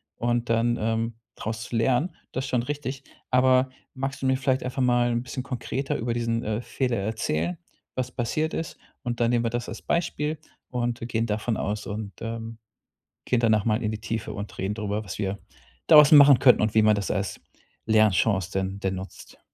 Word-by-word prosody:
und 120 0 -1
dann, 115 +1 +2
ähm, 115 +1 -1 0.2
draus 110 +1 -4
zu 120 - -6
lernen, 130 +9 +1 0.2
das 130 +2 -3
ist - - -6
schon 120 -2 +1
richtig. 135 -1 -4 0.3
Aber 130 0 +4 0.3
magst 135 +1 -4
du - - -2
mir 130 0 +3
vielleicht 130 0 0
einfach 130 +1 -3
mal 120 -1 +3
'n 120 0 0
bisschen 130 0 -5
konkreter 135 +1 -3
über 115 0 -2
diesen, 115 0 -1
äh, 110 +2 -2
Fehler 125 -1 -1
erzählen, 90 -5 -1 0.4
was 130 -1 -2
passiert 155 +7 -1
ist? 165 - -4 0.3
Und 120 -1 -3
dann 120 0 +3
nehmen 120 -1 +1
wir - - +2
das 120 0 -3
als 115 - -7
Beispiel 155 -3 -1 0.3
und 120 0 -2
wir 115 - -5
gehen 115 -1 0
davon 110 +2 -1
aus 105 +1 -3
und, 105 -1 -5
ähm, 115 0 -5 0.7
gehen 125 - +2
danach 110 -3 +3
mal 110 +1 +1
in 105 - 0
die 110 - -5
Tiefe 115 -1 -4
und 100 +1 -7
reden 95 +2 -2
darüber, 105 0 -3
was 95 - -7
wir 100 0 -2 0.5
daraus 150 -2 +8
machen 140 -3 +9
könnten 125 -4 +6
und 110 0 +1
wie 110 - +6
man 110 0 +5
das 100 - -2
als 100 -1 -2 0.5
Lernchance 105 -3 +3
denn 95 +1 -2
denn 95 0 -1
nutzt. 95 +1 -10
115 Hz, 200 wpm, -26 LUFS, 110-130 Hz, 0.7 s, machen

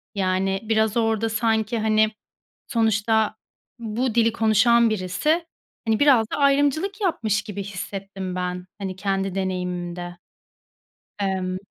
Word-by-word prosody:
yani, 190 0 0
biraz 220 0 +1
orada 225 0 +1
sanki, 220 0 0
hani, 215 0 +3 0.6
sonuçta 220 -2 +1 0.4
bu 230 +2 -2
dili 230 -1 +3
konuşan 230 +1 +4
birisi, 215 - 0 0.4
hani, 220 -1 +2
biraz 255 -7 +5
da - - -1
ayrımcılık 290 +8 +2
yapmış 220 - 0
gibi 205 -2 -6
hissettim 195 -1 -6
ben, 180 0 -3
hani, 190 -2 -4
kendi 195 0 -2
deneyimimde. 180 -2 -3 1.0
Emm 185 -2 -1
215 Hz, 115 wpm, -23 LUFS, 190-230 Hz, 1.0 s, biraz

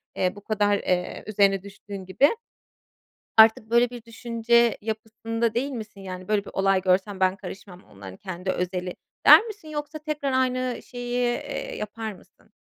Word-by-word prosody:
eee, 185 +1 0
bu 205 - -11
kadar, 205 -1 +2
eee, 180 -2 -2
üzerine 195 -2 +2
düştüğün 200 -1 -9
gibi. 205 - +4 1.1
Artık 220 0 +6
böyle 235 +1 +4
bir 240 -2 -9
düşünce 235 0 +1
yapısında 225 +1 -3
değil 275 +4 -1
misin? 215 -5 -8
Yani, 185 -1 -7
“Böyle 210 -1 +1
bir - - -9
olay 195 -1 +2
görsem 190 +1 +1
ben 185 0 +3
karışmam, 190 -1 -10
onların 95 -2 -12
kendi 185 0 -4
özeli,” 180 0 -3 0.3
der - - +10
misin? 415 -7 -9
Yoksa 300 0 -5
tekrar 300 -2 -2
aynı 255 -1 -1
şeyi, 245 0 -5 0.2
eee, - - -5
yapar 215 0 -5
mısın? - - -21
215 Hz, 155 wpm, -25 LUFS, 190-240 Hz, 1.1 s, der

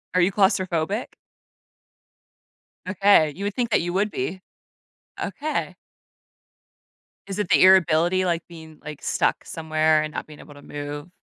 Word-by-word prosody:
Are 185 - +4
you 180 +3 +3
claustrophobic? 190 0 0 1.8
Okay, 195 -6 +4
you 195 - -6
would 205 - -2
think 240 -2 -1
that - - +3
you 175 +1 -3
would 200 +3 +1
be. 175 +9 -4 0.8
Okay. 305 +2 -3 1.5
Is 195 +1 -5
it 205 - -2
the - - +5
irritability, 185 0 +4
like, 170 -2 0
being, 160 -2 -13
like, 150 -1 -8
stuck - - 0
somewhere 155 -1 +1
and 155 0 -5
not - - -5
being 150 -1 -13
able 145 - -13
to 145 - -14
move? 145 +2 -7
175 Hz, 145 wpm, -23 LUFS, 155-195 Hz, 1.8 s, the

